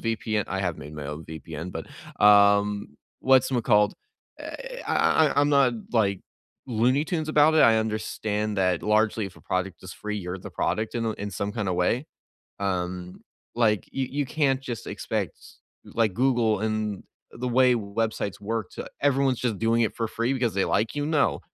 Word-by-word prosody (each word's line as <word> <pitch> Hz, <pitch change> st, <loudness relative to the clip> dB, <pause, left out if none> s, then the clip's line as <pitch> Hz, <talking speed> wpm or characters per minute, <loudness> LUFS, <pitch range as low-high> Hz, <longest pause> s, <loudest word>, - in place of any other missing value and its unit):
VPN. 110 Hz, -2 st, -1 dB
I 95 Hz, 0 st, -3 dB
have 90 Hz, -4 st, -2 dB
made 75 Hz, +3 st, -9 dB
my 75 Hz, -2 st, -6 dB
own 75 Hz, +2 st, -6 dB
VPN, 80 Hz, +2 st, -7 dB
but, -, -, -6 dB, 0.4 s
um, 100 Hz, 0 st, +5 dB, 0.2 s
what's 130 Hz, 0 st, +4 dB
mccalled? 105 Hz, -4 st, +3 dB, 0.5 s
Eh -, -, -7 dB
I 160 Hz, -, +3 dB
I -, -, +2 dB
I'm 145 Hz, -, +3 dB
not, 140 Hz, -3 st, +4 dB, 0.2 s
like, 100 Hz, -5 st, +2 dB, 0.5 s
Looney 125 Hz, +4 st, +2 dB
Tunes 160 Hz, -2 st, -2 dB
about 155 Hz, 0 st, +5 dB
it, -, -, +4 dB
I 110 Hz, -1 st, +6 dB
understand 110 Hz, -1 st, -2 dB
that 90 Hz, -3 st, +1 dB
largely 110 Hz, 0 st, +2 dB
if 95 Hz, -, -12 dB
a -, -, -15 dB
product 95 Hz, 0 st, -3 dB
is 95 Hz, -, -8 dB
free, 105 Hz, 0 st, -5 dB
you're 90 Hz, 0 st, -5 dB
the -, -, -9 dB
product 110 Hz, +1 st, -1 dB
in 115 Hz, -1 st, -1 dB
a 110 Hz, -, 0 dB
in 105 Hz, -1 st, -6 dB
some 100 Hz, +2 st, -3 dB
kind 105 Hz, -3 st, -2 dB
of 90 Hz, -, 0 dB
way. 100 Hz, -, +1 dB, 0.5 s
Um, 90 Hz, -2 st, -3 dB, 0.3 s
like, 110 Hz, -3 st, +1 dB
you 135 Hz, -1 st, -1 dB
you 145 Hz, -, +1 dB
can't 135 Hz, -1 st, +1 dB
just 120 Hz, -4 st, -6 dB
expect, -, -, -3 dB, 0.5 s
like, 115 Hz, -3 st, 0 dB
Google 120 Hz, -4 st, +2 dB
and 110 Hz, -2 st, -2 dB, 0.3 s
the 125 Hz, +1 st, -4 dB
way 130 Hz, -1 st, +6 dB
websites 110 Hz, -2 st, -2 dB
work 110 Hz, -1 st, -3 dB
to -, -, -7 dB
everyone's 135 Hz, -2 st, +2 dB
just 115 Hz, -5 st, -1 dB
doing 115 Hz, +1 st, +2 dB
it 110 Hz, -, -1 dB
for 115 Hz, -, -1 dB
free 115 Hz, +4 st, -1 dB
because 120 Hz, -4 st, 0 dB
they 95 Hz, -, +2 dB
like 110 Hz, +2 st, 0 dB
you? 145 Hz, 0 st, -1 dB
No. 150 Hz, -2 st, +1 dB
110 Hz, 185 wpm, -26 LUFS, 100-125 Hz, 0.5 s, I